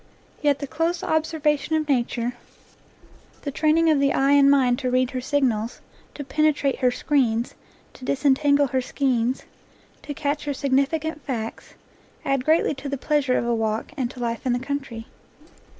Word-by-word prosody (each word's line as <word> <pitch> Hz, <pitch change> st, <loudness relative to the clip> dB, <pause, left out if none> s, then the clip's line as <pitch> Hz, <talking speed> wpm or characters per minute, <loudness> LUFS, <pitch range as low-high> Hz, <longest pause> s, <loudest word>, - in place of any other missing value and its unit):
Yet 290 Hz, -2 st, +3 dB
the 285 Hz, -, -5 dB
close 330 Hz, +5 st, -1 dB
observation 315 Hz, -1 st, 0 dB
of 310 Hz, -1 st, 0 dB
nature, 245 Hz, -3 st, 0 dB, 1.1 s
the 285 Hz, -, -3 dB
training 310 Hz, +3 st, +2 dB
3 320 Hz, -, +5 dB
NATURE 290 Hz, -, +1 dB
LORE 280 Hz, 0 st, +3 dB
of -, -, 0 dB
the -, -, +1 dB
eye 275 Hz, +1 st, +3 dB
and 280 Hz, -1 st, +6 dB
mind 260 Hz, -3 st, +3 dB
to 255 Hz, -2 st, -1 dB
read 255 Hz, +1 st, +1 dB
her 255 Hz, -1 st, -3 dB
signals, 250 Hz, -5 st, 0 dB, 0.4 s
to 290 Hz, -, -5 dB
penetrate 290 Hz, -1 st, +1 dB
her 250 Hz, -, +3 dB
screens, 245 Hz, -3 st, 0 dB, 0.4 s
to -, -, -15 dB
disentangle 285 Hz, +2 st, +3 dB
her 260 Hz, +1 st, 0 dB
skeins, 255 Hz, -2 st, 0 dB, 0.6 s
to 290 Hz, -, -7 dB
catch 295 Hz, 0 st, -2 dB
her 285 Hz, -1 st, -2 dB
significant 285 Hz, +3 st, 0 dB
facts, 230 Hz, -4 st, -5 dB, 0.5 s
add 275 Hz, -2 st, 0 dB
greatly 315 Hz, 0 st, +3 dB
to 275 Hz, 0 st, -7 dB
the 280 Hz, -, -2 dB
pleasure 280 Hz, -2 st, +1 dB
of -, -, -1 dB
a 235 Hz, -, +1 dB
walk 220 Hz, +2 st, -1 dB
and 260 Hz, -4 st, -2 dB
to 260 Hz, -, -11 dB
life 235 Hz, -1 st, -3 dB
in 255 Hz, -, +1 dB
the 245 Hz, -, 0 dB
country. 265 Hz, -4 st, -5 dB
275 Hz, 180 wpm, -24 LUFS, 250-295 Hz, 1.1 s, and